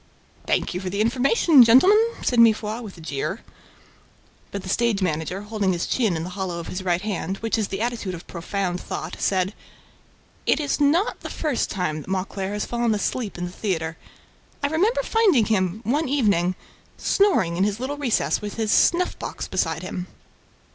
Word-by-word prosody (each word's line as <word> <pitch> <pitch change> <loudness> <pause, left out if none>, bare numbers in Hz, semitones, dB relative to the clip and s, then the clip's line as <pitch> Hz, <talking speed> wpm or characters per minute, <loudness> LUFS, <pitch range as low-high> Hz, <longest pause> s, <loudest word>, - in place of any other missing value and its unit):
"Thank - - 0
you 180 - -2
for 185 -1 -4
the 200 +2 -3
information, 260 - +5
gentlemen," 265 - +6 0.2
said 245 - +2
Mifroid, 220 0 +3
with 205 -6 -9
a - - -11
jeer. 160 +7 -3 1.1
But 200 -1 -5
the - - -8
stage 230 0 +1
manager, 180 +1 -2
holding 205 -3 0
his 175 - -2
chin 215 -9 +1
in 160 - -3
the 180 - -6
hollow 185 -2 -4
of 170 - -6
his 185 - -4
right 180 0 0
hand, 195 -2 -3
which 225 +1 -1
is 220 -3 0
the 195 +1 -4
attitude 230 -6 -2
of 170 - -11
profound 180 +1 -3
thought, 160 +3 -5
said: 190 0 +1 0.9
"It - - +3
is 290 -1 -1
not 310 +8 +2
the - - -7
first 300 -6 -1
time 155 -5 -2
that - - -12
Mauclair 190 +1 -2
has 210 - -2
fallen 235 -2 0
asleep 210 0 -2
in 175 - -3
the 175 - -6
theater. 165 -5 -2 0.7
I 285 - +2
remember 425 +11 +1
finding 400 - +3
him, 195 -1 0
one 280 +5 0
evening, 200 -10 +2 0.4
snoring 355 - +2
in 185 - +1
his 205 +1 0
little 275 +3 -3
recess, 265 -6 0
with 210 -1 -5
his 220 -2 -1
snuff 355 +8 +3
box - - -5
beside 165 -2 -1
him." 180 0 -5
205 Hz, 185 wpm, -23 LUFS, 180-245 Hz, 1.1 s, gentlemen